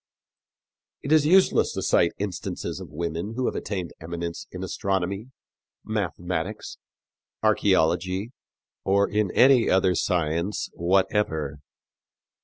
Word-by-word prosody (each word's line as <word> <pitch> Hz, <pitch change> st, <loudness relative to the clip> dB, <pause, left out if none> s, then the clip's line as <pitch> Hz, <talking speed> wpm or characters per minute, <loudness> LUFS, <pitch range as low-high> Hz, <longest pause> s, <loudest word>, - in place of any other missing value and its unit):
It 140 Hz, -, -4 dB
is 155 Hz, -1 st, +5 dB
useless 190 Hz, +3 st, +4 dB
to -, -, -3 dB
cite 85 Hz, -, +3 dB
instances 100 Hz, -3 st, -4 dB
of -, -, -9 dB
women 85 Hz, +6 st, -4 dB
who 130 Hz, 0 st, -1 dB
have -, -, 0 dB
attained 95 Hz, -5 st, -4 dB
eminence 85 Hz, +1 st, -5 dB
in 90 Hz, 0 st, -6 dB
astronomy, 95 Hz, +4 st, -2 dB, 0.6 s
mathematics, 95 Hz, -2 st, -3 dB, 0.6 s
archæology, 90 Hz, +6 st, +2 dB, 0.5 s
or 100 Hz, +1 st, +3 dB
in 105 Hz, -1 st, 0 dB
any 130 Hz, -2 st, +6 dB
other 95 Hz, -1 st, +3 dB
science 85 Hz, +1 st, -1 dB
whatever. 85 Hz, -5 st, 0 dB
95 Hz, 105 wpm, -25 LUFS, 85-105 Hz, 0.6 s, any